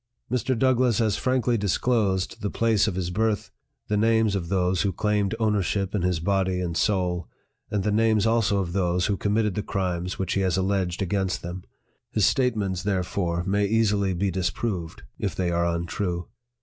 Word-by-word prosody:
Mr. 125 0 0
DOUGLASS 125 -2 +3
has 110 -4 +2
frankly 125 -2 +1
disclosed 100 0 0
the 100 - -1
place 110 -1 +2
of 100 - -1
his 90 -1 -2
birth, 110 +1 0 0.4
the 105 - 0
names 110 0 +3
of 90 -4 -2
those 90 -2 +1
who 100 - +1
claimed 105 +1 0
ownership 100 -2 0
in 105 - 0
his 90 -2 0
body 95 +1 0
and 85 -2 -3
soul, 90 -3 0 0.4
and 105 -2 -1
the 105 - +1
names 110 0 +3
also 110 -3 +2
of 90 -3 -2
those 90 -1 +1
who 105 - +1
committed 105 +1 0
the 105 - -2
crimes 90 -2 -2
which 95 - -2
he 100 - +1
has 95 -1 +1
alleged 95 -1 0
against 95 0 -1
them. 90 +1 -6 0.5
His 105 -3 +2
statements, 105 -8 +1
therefore, 90 -3 -1
may 100 +2 +1
easily 100 -3 +2
be 95 +2 0
dis 90 -1 0
proved, 85 - -4 0.2
if - - -2
they 90 -2 0
are 85 0 +1
untrue. 85 +1 -2
100 Hz, 180 wpm, -25 LUFS, 90-105 Hz, 0.5 s, DOUGLASS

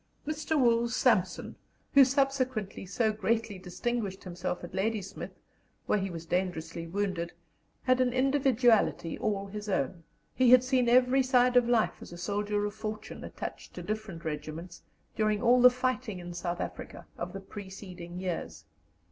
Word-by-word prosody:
Mr. 310 0 -1
Wools 235 -1 +3
Sampson, - - +1 0.4
who 280 - +9
subsequently 260 -7 0
so 220 +3 +1
greatly 220 -2 -1
distinguished 195 +2 -3
himself 180 -1 -4
at 175 - -8
Ladysmith, 200 -1 -3 0.5
where 210 - +2
he 195 0 -2
was 165 -2 -7
dangerously 165 -2 -2
wounded, 185 -2 -2 0.5
had 255 0 +3
an 250 -1 +2
individuality 255 - +3
all 200 -2 -1
his 210 +1 -6
own; 170 -1 -1 0.3
he 255 -2 +4
had 250 0 +8
seen 255 -2 +2
every 250 +2 +5
side 250 -1 +3
of 245 -1 +5
life 235 -3 +2
as - - -10
a 175 - -8
soldier 205 +3 -1
of 205 - -3
fortune, 215 0 -6
attached - - -7
to - - -6
different 215 -6 -5
regiments, 155 +3 -5 0.3
during 215 -1 +1
all 245 +2 +5
the 250 - +10
fighting 250 -4 -2
in 175 0 -7
South 175 0 -3
Africa - - -7
of 175 +1 -5
the 195 - -6
preceding 190 -3 -9
years. 185 -2 -4
210 Hz, 155 wpm, -30 LUFS, 180-250 Hz, 0.5 s, the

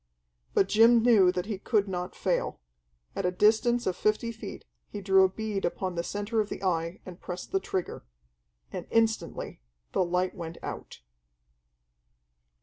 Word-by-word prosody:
But 195 - +4
Jim 230 +2 +6
knew 210 -7 +6
that 180 0 -3
he 205 -3 -4
could 210 -1 +1
not 180 -1 -4
fail. - - -1 0.6
At 195 - -2
a 180 - +2
distance 220 +5 +3
of 185 - 0
fifty 215 +2 0
feet 225 - -9 0.2
he 205 - -6
drew 190 -1 +5
a 190 - +4
bead 210 0 -3
upon 185 +1 -2
the 170 - -1
centre 205 +5 -1
of 210 - -4
the - - -6
Eye 170 -1 -1
and 180 -2 -10
pressed 180 0 -6
the 195 - +2
trigger. 185 -1 -4 0.7
And - - -6
instantly 225 - 0 0.3
the - - +2
light 180 +1 0
went 170 -1 -7
out.... - - -7
195 Hz, 160 wpm, -28 LUFS, 180-220 Hz, 0.7 s, Jim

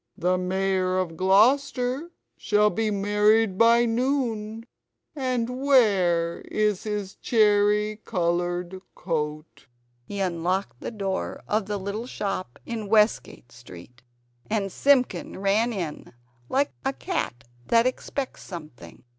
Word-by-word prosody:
The 180 +1 +1
Mayor 185 0 0
of 180 -3 -2
Gloucester 250 - +2 0.3
shall 210 0 +2
be 220 -1 0
married 210 +1 +2
by 230 +3 +5
noon 230 -3 -1 0.5
and 255 -4 -1
where 190 -11 +3
is 210 -3 +1
his 205 -2 -3
cherry 210 -1 +2
coloured 175 +1 -1
coat?" 155 -4 -4 0.4
He 200 +10 -7
unlocked 180 -4 -1
the - - -5
door 195 -4 -4
of 210 -1 0
the 210 -1 -2
little 200 +5 -5
shop 195 - -4
in 225 -3 -5
Westgate 210 - +1
Street, 120 0 -14 0.5
and 205 -3 -1
Simpkin 255 -8 +1
ran 200 +5 +1
in, 175 -8 -5 0.4
like 280 +2 +1
a 270 - 0
cat 270 - -3 0.2
that 230 0 +4
expects 255 +1 -3
something. 155 -9 -10
205 Hz, 115 wpm, -25 LUFS, 180-230 Hz, 0.5 s, by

